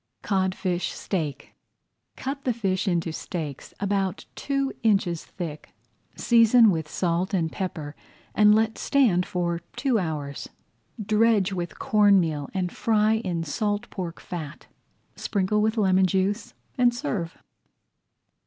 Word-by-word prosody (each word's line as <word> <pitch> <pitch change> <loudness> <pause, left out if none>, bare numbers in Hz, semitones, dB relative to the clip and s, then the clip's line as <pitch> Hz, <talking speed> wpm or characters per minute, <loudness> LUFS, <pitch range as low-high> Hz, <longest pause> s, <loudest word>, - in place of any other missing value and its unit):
CODFISH 185 -2 -1
STEAK 160 -7 -4 0.6
Cut 275 +1 -5
the 250 - +1
fish 195 -3 -1
into 170 -2 0
steaks, 155 -6 -6
about 195 -2 -1
two 275 -1 -2
inches 195 -7 +1
thick, 160 -5 -8 0.4
season 230 -1 +5
with 160 -3 -3
salt 180 +4 0
and 165 -3 0
pepper, 155 -6 -5 0.4
and 210 0 +6
let 220 0 +1
stand 220 -11 +2
for 170 -1 -1 0.2
two 260 -6 +1
hours. 150 -5 -4 0.5
Dredge 215 -2 +2
with 175 -2 -4
corn 205 -2 +4
meal 155 -5 -2
and 185 -2 -2
fry 220 0 +2
in 180 -6 -2
salt 205 +7 -2
pork 175 -3 -5
fat. 160 -4 -7 0.5
Sprinkle 205 +1 0
with 220 +2 +1
lemon 190 -2 +4
juice 200 +6 -1 0.2
and 240 -1 +4
serve. 215 - -3
190 Hz, 125 wpm, -25 LUFS, 170-215 Hz, 0.6 s, and